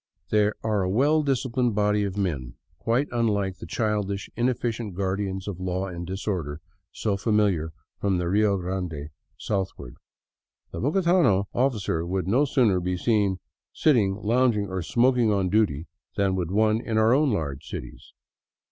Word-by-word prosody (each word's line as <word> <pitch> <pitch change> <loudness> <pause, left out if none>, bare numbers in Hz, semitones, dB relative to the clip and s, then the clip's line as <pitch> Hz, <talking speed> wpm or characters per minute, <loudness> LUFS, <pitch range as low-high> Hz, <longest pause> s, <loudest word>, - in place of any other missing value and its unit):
They 105 -1 +4
are 110 -3 +1
a 90 - 0
well 145 +10 +3
disciplined 130 -4 0
body 105 0 +2
of 100 0 -4
men, 70 -11 -2 0.2
quite 120 +6 +1
unlike 105 -5 0
the - - -8
childish, 105 -3 -2
inefficient 120 -4 -1
guardians 95 0 -2
of 95 -3 -5
law 95 +1 -2
and 85 -2 -6
dis 95 +2 -5
order 80 -7 -2 0.3
so 105 -3 -1
famihar 100 -6 +1 0.3
from 100 -2 +1
the 90 -1 -1
Rio 100 +2 +2
Grande 90 -5 -4 0.3
southward. 95 - -3 0.8
The - - -5
bogotano 165 - +3
officer 110 -10 0
would 90 +1 -2
no 125 +9 +3
sooner 120 -9 +2
be 90 +1 -2
seen 100 -2 +1 0.4
sitting, 110 -11 +3
lounging, 110 -1 +1
or 95 -1 -3
smoking 120 +4 +2
on 95 -3 +1
duty 95 -7 +1 0.3
than 95 -1 +2
would 90 -3 -2
one 110 +3 +2
in 110 -1 -1
our 110 +2 +4
own 145 +2 +3
large 70 -9 -3
cities. 60 0 -8
100 Hz, 155 wpm, -25 LUFS, 95-115 Hz, 0.8 s, They